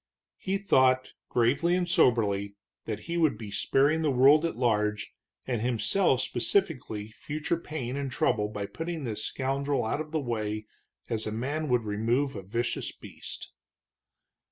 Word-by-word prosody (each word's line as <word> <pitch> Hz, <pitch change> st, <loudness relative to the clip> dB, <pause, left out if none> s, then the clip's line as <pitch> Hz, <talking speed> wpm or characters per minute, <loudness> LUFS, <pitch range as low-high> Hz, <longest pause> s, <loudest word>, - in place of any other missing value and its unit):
He 195 Hz, 0 st, -1 dB
thought, 130 Hz, -9 st, +3 dB, 0.2 s
gravely 140 Hz, +9 st, +2 dB
and 180 Hz, -1 st, 0 dB
soberly, 100 Hz, -, +2 dB, 0.3 s
that 110 Hz, -2 st, -4 dB
he 170 Hz, 0 st, -3 dB
would 155 Hz, -9 st, +3 dB
be 105 Hz, -2 st, -8 dB
sparing 140 Hz, +9 st, +2 dB
the 155 Hz, -, +2 dB
world 140 Hz, +4 st, +6 dB
at 165 Hz, -, -2 dB
large, 105 Hz, -4 st, 0 dB, 0.3 s
and 120 Hz, -4 st, -1 dB
himself 125 Hz, -, +2 dB
specifically, 125 Hz, -, -1 dB
future 150 Hz, +8 st, -3 dB
pain 135 Hz, -6 st, -5 dB
and 140 Hz, -1 st, -3 dB
trouble 105 Hz, -4 st, +1 dB
by 105 Hz, -2 st, -4 dB
putting 165 Hz, +6 st, -5 dB
this 110 Hz, -4 st, -3 dB
scoundrel 135 Hz, 0 st, -1 dB
out 125 Hz, +7 st, -1 dB
of 155 Hz, -, -7 dB
the 160 Hz, 0 st, -1 dB
way 110 Hz, -5 st, -3 dB, 0.4 s
as 110 Hz, -1 st, -2 dB
a -, -, -2 dB
man 140 Hz, +7 st, -2 dB
would 125 Hz, -2 st, +2 dB
remove 115 Hz, +6 st, 0 dB
a 100 Hz, -, -5 dB
vicious 115 Hz, +6 st, -2 dB
beast. -, -, -10 dB
125 Hz, 155 wpm, -28 LUFS, 110-150 Hz, 0.4 s, world